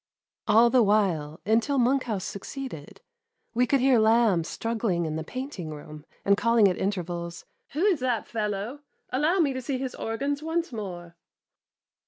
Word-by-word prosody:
All 235 Hz, +2 st, +6 dB
the 255 Hz, 0 st, +5 dB
while, 185 Hz, -8 st, +1 dB
until 225 Hz, +7 st, +2 dB
Monkhouse 245 Hz, -6 st, +1 dB
succeeded, 200 Hz, -, -7 dB, 0.5 s
we 245 Hz, +2 st, +2 dB
could 275 Hz, +1 st, +2 dB
hear 260 Hz, -2 st, +5 dB
Lamb 220 Hz, -5 st, +4 dB
struggling 220 Hz, -2 st, -1 dB
in 155 Hz, -1 st, -3 dB
the 160 Hz, -, -3 dB
painting 255 Hz, -, -6 dB
room, 150 Hz, 0 st, -10 dB, 0.2 s
and 200 Hz, -, +5 dB
calling 230 Hz, -1 st, +4 dB
at 185 Hz, -, +1 dB
inter 195 Hz, -2 st, -1 dB
vals, 170 Hz, 0 st, -6 dB
" -, -, -49 dB
Who 315 Hz, +7 st, +1 dB
is 380 Hz, -7 st, +3 dB
that 250 Hz, -3 st, -1 dB
fellow 210 Hz, +4 st, -3 dB, 0.3 s
1 255 Hz, +2 st, 0 dB
Allow 330 Hz, +5 st, +3 dB
me 285 Hz, -4 st, +2 dB
to 260 Hz, -, -4 dB
see 260 Hz, +1 st, -2 dB
his 260 Hz, -1 st, -4 dB
organs 280 Hz, +6 st, -2 dB
once 325 Hz, -1 st, -2 dB
more." 175 Hz, -6 st, -7 dB
225 Hz, 170 wpm, -27 LUFS, 180-260 Hz, 0.5 s, All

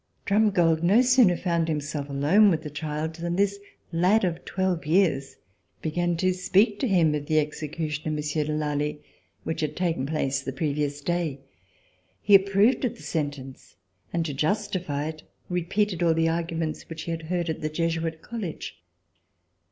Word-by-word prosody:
Drumgold 195 Hz, -6 st, +3 dB
no 200 Hz, +9 st, +5 dB
sooner 245 Hz, -8 st, +5 dB
found 170 Hz, -2 st, 0 dB
himself 150 Hz, -2 st, -3 dB
alone 155 Hz, +10 st, +4 dB
with 160 Hz, -4 st, 0 dB
the 150 Hz, -, -6 dB
child 150 Hz, +1 st, -3 dB
than 170 Hz, +1 st, -3 dB
this 200 Hz, +1 st, +1 dB, 0.3 s
lad 185 Hz, +6 st, +3 dB
of 170 Hz, -1 st, -3 dB
twelve 185 Hz, -3 st, -1 dB
years 155 Hz, -5 st, +1 dB, 0.5 s
began 175 Hz, +2 st, 0 dB
to 185 Hz, +2 st, +2 dB
speak 200 Hz, +3 st, +2 dB
to 265 Hz, -, 0 dB
him 170 Hz, -7 st, +3 dB
of 145 Hz, -1 st, -3 dB
the 155 Hz, -, +2 dB
execution 150 Hz, 0 st, -2 dB
of 155 Hz, -, -1 dB
Monsieur 150 Hz, 0 st, -1 dB
de 150 Hz, -, -3 dB
Lally 150 Hz, -1 st, -2 dB, 0.4 s
which 160 Hz, -, -3 dB
had 155 Hz, -, -2 dB
taken 165 Hz, -7 st, -1 dB
place 140 Hz, -3 st, -1 dB
the 135 Hz, -, -4 dB
previous 145 Hz, 0 st, -2 dB
day. 165 Hz, -4 st, -2 dB, 0.8 s
He 205 Hz, -, +1 dB
approved 200 Hz, +6 st, +5 dB
of 250 Hz, -, 0 dB
the -, -, -14 dB
sentence, 145 Hz, -, -5 dB, 0.4 s
and, 170 Hz, -1 st, -1 dB
to 150 Hz, -, -3 dB
justify 170 Hz, -2 st, -1 dB
it, 155 Hz, -1 st, -8 dB, 0.3 s
repeated 180 Hz, +2 st, 0 dB
all 165 Hz, -2 st, +3 dB
the 165 Hz, 0 st, +2 dB
arguments 165 Hz, -1 st, -3 dB
which 160 Hz, -1 st, -6 dB
he 170 Hz, -, -4 dB
had 165 Hz, 0 st, -3 dB
heard 175 Hz, -1 st, -1 dB
at 160 Hz, -, -3 dB
the 155 Hz, -, -1 dB
Jesuit 165 Hz, 0 st, -2 dB
College. 220 Hz, -9 st, -6 dB
165 Hz, 165 wpm, -26 LUFS, 150-185 Hz, 0.8 s, no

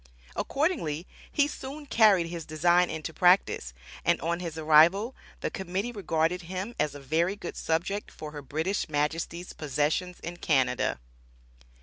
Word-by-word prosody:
Accordingly 265 Hz, -, -1 dB, 0.3 s
he 290 Hz, -1 st, +3 dB
soon 290 Hz, +1 st, -7 dB
carried 215 Hz, -9 st, +5 dB
his 165 Hz, 0 st, -5 dB
design 175 Hz, +3 st, +3 dB
into 160 Hz, +1 st, -5 dB
practice, 175 Hz, -, +3 dB, 0.3 s
and -, -, +3 dB
on 170 Hz, +1 st, -1 dB
his 170 Hz, -3 st, -5 dB
arrival, 165 Hz, +10 st, +5 dB, 0.3 s
the -, -, -2 dB
Committee 190 Hz, +5 st, -3 dB
regarded 175 Hz, -4 st, 0 dB
him 185 Hz, +6 st, -5 dB
as 150 Hz, -1 st, 0 dB
a -, -, -7 dB
very 165 Hz, +7 st, 0 dB
good 205 Hz, -, -7 dB
subject 175 Hz, +6 st, -1 dB
for 155 Hz, -1 st, -8 dB
her 150 Hz, -1 st, -7 dB
British 160 Hz, +8 st, -2 dB
Majesty's 160 Hz, +4 st, -2 dB
possessions 155 Hz, +5 st, -1 dB
in 175 Hz, +1 st, -6 dB
Canada. 130 Hz, -, +1 dB
170 Hz, 140 wpm, -28 LUFS, 155-195 Hz, 0.3 s, carried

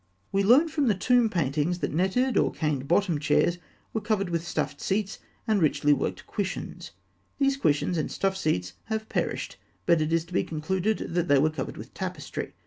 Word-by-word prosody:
] 95 Hz, +2 st, -42 dB
We 195 Hz, -, +2 dB
learn 250 Hz, +11 st, +6 dB
from 295 Hz, -3 st, 0 dB
the 210 Hz, -, +3 dB
tomb 240 Hz, +4 st, +3 dB
paintings 155 Hz, 0 st, 0 dB
that -, -, -3 dB
netted 195 Hz, +9 st, +1 dB
or -, -, +3 dB
cane 150 Hz, -4 st, -1 dB
bottomed 170 Hz, -1 st, +2 dB
chairs 170 Hz, +3 st, +2 dB, 0.3 s
were 220 Hz, -, -1 dB
covered 195 Hz, -3 st, 0 dB
with 170 Hz, 0 st, -2 dB
stuffed -, -, -2 dB
seats 200 Hz, 0 st, -1 dB, 0.3 s
and 215 Hz, -3 st, +2 dB
richly 150 Hz, -1 st, +3 dB
worked 140 Hz, -, -2 dB
cushions. 190 Hz, -3 st, -4 dB, 0.5 s
These 275 Hz, -1 st, +2 dB
cushions 160 Hz, -, +1 dB
and 155 Hz, -, -2 dB
stuffed 195 Hz, 0 st, -1 dB
seats 90 Hz, -, -1 dB
have 220 Hz, -1 st, -3 dB
perished, -, -, -2 dB, 0.3 s
but 170 Hz, -2 st, +4 dB
it 155 Hz, +1 st, 0 dB
is 165 Hz, 0 st, +1 dB
to 175 Hz, -, -14 dB
be -, -, +2 dB
concluded 185 Hz, +6 st, -2 dB
that 175 Hz, 0 st, +1 dB
they 145 Hz, -, +5 dB
were 155 Hz, +3 st, +3 dB
covered 155 Hz, -, -5 dB
with -, -, -10 dB
tapestry. -, -, -5 dB
180 Hz, 195 wpm, -27 LUFS, 155-215 Hz, 0.5 s, learn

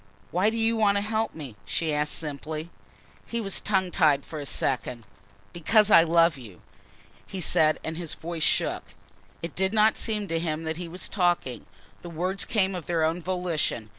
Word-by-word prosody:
"Why 185 Hz, +5 st, +3 dB
do 225 Hz, -, -3 dB
you 225 Hz, 0 st, +2 dB
want 205 Hz, -2 st, +3 dB
to -, -, +1 dB
help 220 Hz, +1 st, -1 dB
me?" 140 Hz, -8 st, -8 dB
she 160 Hz, -2 st, -2 dB
asked 150 Hz, 0 st, +1 dB
simply. 155 Hz, +2 st, -5 dB, 0.6 s
He 235 Hz, -, -3 dB
was 195 Hz, -3 st, 0 dB
tongue 190 Hz, -3 st, 0 dB
tied 145 Hz, -4 st, +3 dB
for 155 Hz, -, -7 dB
a 145 Hz, -, -6 dB
second. 125 Hz, -3 st, -1 dB, 0.5 s
"Because 210 Hz, +5 st, +3 dB
I 165 Hz, -, +9 dB
love 165 Hz, -2 st, +3 dB
you," 105 Hz, -8 st, -13 dB, 0.7 s
he 190 Hz, -, -6 dB
said, 155 Hz, -2 st, +3 dB
and 160 Hz, 0 st, -4 dB
his 170 Hz, -3 st, -4 dB
voice 165 Hz, 0 st, -6 dB
shook. -, -, +2 dB, 0.6 s
It 170 Hz, -, -4 dB
did 190 Hz, +3 st, 0 dB
not 215 Hz, +1 st, +4 dB
seem 210 Hz, -3 st, -1 dB
to 165 Hz, 0 st, 0 dB
him 160 Hz, -1 st, -2 dB
that 160 Hz, 0 st, -3 dB
he 175 Hz, -1 st, -5 dB
was 180 Hz, +2 st, -4 dB
talking. 175 Hz, -, 0 dB, 0.3 s
The 175 Hz, -, -8 dB
words 180 Hz, +4 st, -1 dB
came 195 Hz, -3 st, +1 dB
of 180 Hz, -3 st, -6 dB
their 165 Hz, -2 st, +1 dB
own 165 Hz, +3 st, 0 dB
volition. 170 Hz, -11 st, -2 dB
170 Hz, 190 wpm, -26 LUFS, 155-195 Hz, 0.7 s, I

